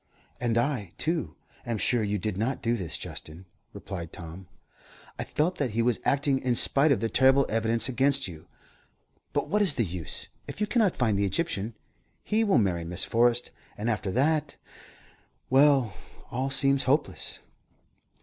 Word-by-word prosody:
"And 120 -2 0
I, 120 - -1
too, 155 - -1 0.3
am 115 -2 -2
sure 120 +3 +2
you 105 -1 -1
did 105 +1 -2
not 115 +7 -2
do 120 +1 +1
this, 90 -8 -3
Justin," 80 +4 -7 0.3
replied 85 -4 -7
Tom. 85 +2 -10 0.7
"I - - -1
felt 175 +5 -1
that 140 -4 0
he 115 - +3
was 120 -1 +1
acting, 140 -1 +2
in 125 -2 0
spite 140 +5 +5
of 135 - +2
the 115 - +1
terrible 135 +3 +4
evidence 115 +1 +1
against 135 +1 +1
you. 80 -4 -11 0.8
But - - -1
what 210 +1 +1
is 190 -8 +4
the 115 - +1
use? 85 -3 -4 0.2
If - - -7
you 210 - +2
cannot 210 -4 +2
find 110 -6 +1
the 100 - +2
Egyptian, 110 - -2 0.5
he 220 +1 +2
will 205 -3 +3
marry 90 -6 +1
Miss 85 +1 -1
Forrest, 120 +1 +2 0.3
and 110 +3 -1
after 105 -3 -2
that 150 +4 +1 1.0
well, 135 -5 +4 0.4
all 130 +3 -1
seems 135 0 +2
hopeless." 145 +4 0
120 Hz, 165 wpm, -27 LUFS, 105-140 Hz, 1.0 s, spite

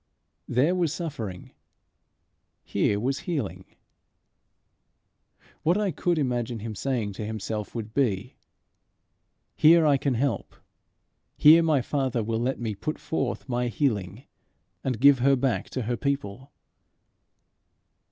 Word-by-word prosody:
There 130 +8 +2
was 175 -4 +1
suffering; 140 - -6 1.1
here 100 - 0
was 135 +5 -1
healing. 95 - -3 2.0
What 170 +5 +2
I 210 -2 0
could 175 0 0
imagine 120 -4 -1
him 110 +1 -6
saying 110 -2 -2
to 105 - -6
himself 105 0 -4
would 110 -2 -5
be, 120 -3 0 1.2
"Here 165 +1 +6
I 145 -2 +4
can 135 -1 -1
help! 120 -4 -2 0.8
Here 160 +3 +8
my 155 -6 +2
Father 130 -5 -1
will 110 +1 -1
let 125 +3 -1
me 115 -3 -2
put 155 +10 -4
forth 135 -5 -3
my 125 -1 -1
healing, 110 - -1 0.6
and 125 -5 -2
give 140 -1 +6
her 135 +2 +4
back 130 -2 -1
to 130 - -3
her 120 +2 -2
people." 135 -1 -3
125 Hz, 125 wpm, -26 LUFS, 110-145 Hz, 2.0 s, Here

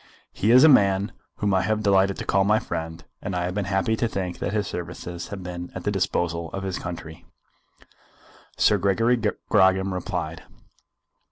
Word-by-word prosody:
"He 105 - 0
is 125 +4 +8
a - - +9
man 100 -7 +4 0.2
whom 100 -2 0
I 95 - +3
have 110 +2 -1
delighted 100 -1 +3
to - - -5
call 95 0 +2
my 105 +2 +3
friend, 80 -4 -5 0.2
and 95 - -4
I 90 - -1
have 90 +1 -2
been 100 0 -2
happy 95 +3 0
to 115 - +1
think 95 -5 -4
that - - -2
his 105 0 0
services 85 0 -6
have 100 -2 -7
been 90 0 -6
at - - -6
the - - 0
disposal 85 -1 -1
of 95 - -4
his 95 -1 -3
country." 80 -2 -7 1.3
Sir 105 - +4
Gregory 105 +6 +2
Grogram 95 -3 +2
replied. 85 -3 -4
95 Hz, 180 wpm, -24 LUFS, 90-105 Hz, 1.3 s, a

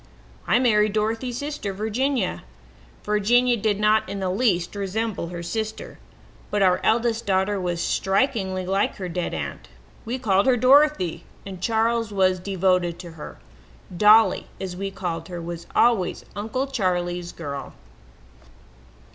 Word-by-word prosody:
"I - - +4
married 215 -4 +3
Dorothy's 225 +3 -1
sister, 285 -9 -4
Virginia. 220 +2 -1 0.6
Virginia 240 +4 +3
did 210 -2 0
not 215 +1 +2
in 200 - -4
the 190 -1 -1
least 185 -5 +1
resemble 205 -1 -2
her 170 0 -6
sister, 220 +4 -5 0.5
but 205 -1 +1
our 180 -1 +4
eldest 230 0 +1
daughter 190 +1 +1
was 175 -1 -2
strikingly 190 -3 0
like 195 +2 0
her 185 - -5
dead 175 0 -3
aunt. 70 -3 -6 0.4
We 240 +3 -3
called 200 -3 +2
her 255 -2 +4
Dorothy, 255 - +4 0.2
and 190 -2 -8
Charles 230 +1 +1
was 185 -2 +2
devoted 180 -2 0
to 175 -2 -9
her. 160 -2 -10 0.6
Dolly, 215 +4 +5
as 185 -2 -5
we 195 +2 -3
called 170 -4 -5
her, 175 -1 -6
was 170 0 -7
always 230 -7 +2
'Uncle 225 +6 -2
Charley's 180 -8 -2
girl.' 140 -4 -7
200 Hz, 140 wpm, -24 LUFS, 180-225 Hz, 0.6 s, Dolly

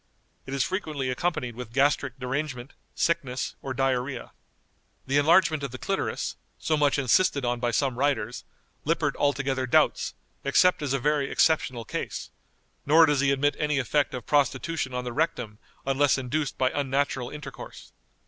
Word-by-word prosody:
It 135 - -4
is 135 - +2
frequently 150 -8 -2
accompanied 140 -4 -2
with 120 -2 -8
gastric 135 -1 +2
derangement, 130 0 -4 0.2
sickness, 140 -7 -1
or 135 - -5
diarrhoea. 130 -1 -1 0.7
The 140 +2 +2
enlargement 155 0 +4
of 140 - -3
the 130 - -7
clitoris, - - -2 0.2
so 155 - 0
much 145 -1 +2
insisted 140 +1 +2
on 120 0 0
by 120 0 0
some 125 +1 0
writers, 125 -5 0 0.4
Lippert 155 -2 0
altogether 140 -2 0
doubts, - - +2 0.3
except 180 +6 +4
as 140 -3 -1
a - - +2
very 145 +1 +1
exceptional 130 -7 +1
case; - - -5 0.5
nor 160 +3 +6
does 150 -3 +1
he 140 0 +3
admit 140 +1 +2
any 150 -1 +1
effect 135 +3 +1
of 125 - -6
prostitution 145 0 0
on 125 - -2
the 125 -1 -5
rectum 125 -8 -2 0.3
unless 135 +1 +3
induced 135 +3 -2
by 130 0 +2
unnatural 135 -2 -1
intercourse. 150 0 -9
140 Hz, 155 wpm, -26 LUFS, 125-150 Hz, 0.7 s, nor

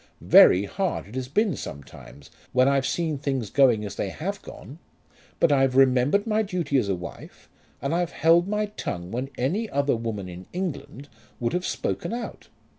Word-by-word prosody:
Very 95 +3 +8
hard 190 - -2
it 105 - -14
has 130 0 -4
been 205 - +1
sometimes 70 -1 -10 0.2
when 130 +1 +4
I've 140 -1 +2
seen 160 -4 -1
things 135 -7 -2
going 125 -6 +4
as 100 -1 -7
they 100 - -2
have 195 - -5
gone; 145 +5 -11 0.6
but 165 - +4
I've 135 -2 +3
remembered 135 +8 +4
my 220 -1 +1
duty 175 -9 0
as 105 -5 -2
a 95 - +1
wife, 90 0 -10 0.4
and 140 +3 -1
I've 175 0 0
held 170 +2 +4
my 210 +1 0
tongue 90 - -6
when 125 +4 -3
any 190 - -1
other 140 -1 +1
woman 110 -4 -4
in 90 +1 -10
England 170 -6 -5 0.3
would 120 -1 -1
have 180 +1 -1
spoken - - -3
out. 240 0 -6
135 Hz, 180 wpm, -25 LUFS, 115-175 Hz, 0.6 s, Very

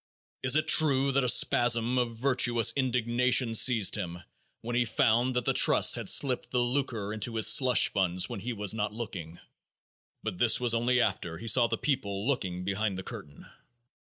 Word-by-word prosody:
It 130 +1 +2
is - - +3
true 140 -4 +2
that 135 0 0
a 125 - 0
spasm 120 +1 +2
of 115 -2 -4
virtuous 120 -2 +1
indignation 125 -2 0
seized 115 -3 +3
him 90 -3 -6 0.4
when 120 +1 -6
he 120 - +2
found 120 +2 0
that 125 -1 -2
the - - +1
trusts - - +4
had - - -1
slipped 130 -3 +1
the 125 - -4
lucre 120 -5 -3
into 110 +2 -3
his 110 - +2
slush 125 +2 +4
funds 90 -2 -1
when - - -7
he 120 +6 -6
was 105 -3 -1
not 105 -1 -4
looking, 90 -8 -8 0.9
but 105 -5 -6
this 120 -2 +3
was 120 -2 0
only 120 +2 0
after 90 -7 -3
he 115 - -10
saw 120 +1 +3
the 115 0 -3
people 100 -8 -3
looking 95 -10 -3
behind 100 0 -3
the 95 - -7
curtain. 70 -4 -11
115 Hz, 185 wpm, -27 LUFS, 105-125 Hz, 0.9 s, trusts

